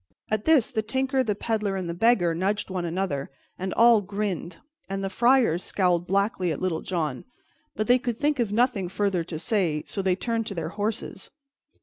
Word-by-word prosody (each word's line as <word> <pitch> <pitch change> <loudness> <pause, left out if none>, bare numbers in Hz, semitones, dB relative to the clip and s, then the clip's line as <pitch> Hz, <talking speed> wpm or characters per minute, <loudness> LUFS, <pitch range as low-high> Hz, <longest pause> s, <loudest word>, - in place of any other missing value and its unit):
At 215 -1 0
this 295 -6 +4
the 220 -4 0
Tinker 265 +4 -1
and 260 - +1
the 210 - +1
Peddler 210 -2 -1
and 185 -2 -3
the 170 - -3
Beggar 175 -3 +3
nudged 195 +4 -1
one 180 -2 -2
another, 170 -5 -2 0.3
and 190 +1 -3
all 230 -2 +6
grinned, 195 -4 -4 0.3
and 195 0 -3
the 195 - -2
friars 235 -6 +3
scowled 180 -2 +1
blackly 195 -2 +1
at 150 - -3
Little 180 -3 -1
John; 155 -8 -2 0.5
but 215 - -1
they 245 +3 +4
could 240 -2 -3
think 295 0 0
of 230 -4 0
nothing 220 -5 +1
further 195 -2 0
to 165 -1 -6
say, 170 -4 0
so 200 - -3
they 190 -1 +2
turned 225 +2 -2
to 200 - -5
their 165 -2 -3
horses. 205 0 -4
195 Hz, 200 wpm, -26 LUFS, 180-225 Hz, 0.5 s, all